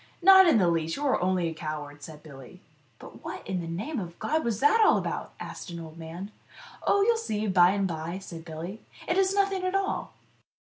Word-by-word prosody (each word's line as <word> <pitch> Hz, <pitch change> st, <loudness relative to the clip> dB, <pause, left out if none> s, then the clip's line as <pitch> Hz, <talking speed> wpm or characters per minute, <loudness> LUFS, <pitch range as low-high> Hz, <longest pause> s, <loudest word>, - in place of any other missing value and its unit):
" -, -, -33 dB
Not 380 Hz, 0 st, +9 dB
in 320 Hz, -, +5 dB
the 185 Hz, -4 st, +3 dB
least! 165 Hz, -1 st, 0 dB
You 290 Hz, -, -3 dB
are 270 Hz, -, +2 dB
only 180 Hz, -1 st, +1 dB
a 165 Hz, -, -3 dB
coward," 150 Hz, -2 st, -6 dB
said 150 Hz, 0 st, -11 dB
Billy. 135 Hz, -5 st, -12 dB, 0.4 s
"But -, -, -13 dB, 0.3 s
in 185 Hz, -2 st, -2 dB
the 165 Hz, -, -6 dB
name 215 Hz, -, -3 dB
of 170 Hz, -3 st, -7 dB
God, 315 Hz, +2 st, 0 dB
what 275 Hz, -, -4 dB
is 225 Hz, +1 st, -2 dB
it 370 Hz, +11 st, +5 dB
all 425 Hz, -, +6 dB
about?" -, -, -4 dB
asked -, -, -8 dB
an 170 Hz, -1 st, -6 dB
old 160 Hz, 0 st, -10 dB
man. 170 Hz, +5 st, -7 dB, 0.3 s
" -, -, -15 dB
Oh, 400 Hz, -, +4 dB
you'll 460 Hz, +2 st, +3 dB
see 215 Hz, -, -2 dB
by 180 Hz, -3 st, +5 dB
and 195 Hz, 0 st, +1 dB
bye," 165 Hz, +1 st, -4 dB
said 170 Hz, -4 st, -9 dB
Billy; 170 Hz, +6 st, -7 dB
" -, -, -17 dB
it 350 Hz, -, +1 dB
is 390 Hz, 0 st, +2 dB
nothing 390 Hz, -2 st, +1 dB
at 370 Hz, +1 st, -1 dB
all." 390 Hz, 0 st, -1 dB
185 Hz, 235 wpm, -27 LUFS, -, 0.4 s, Not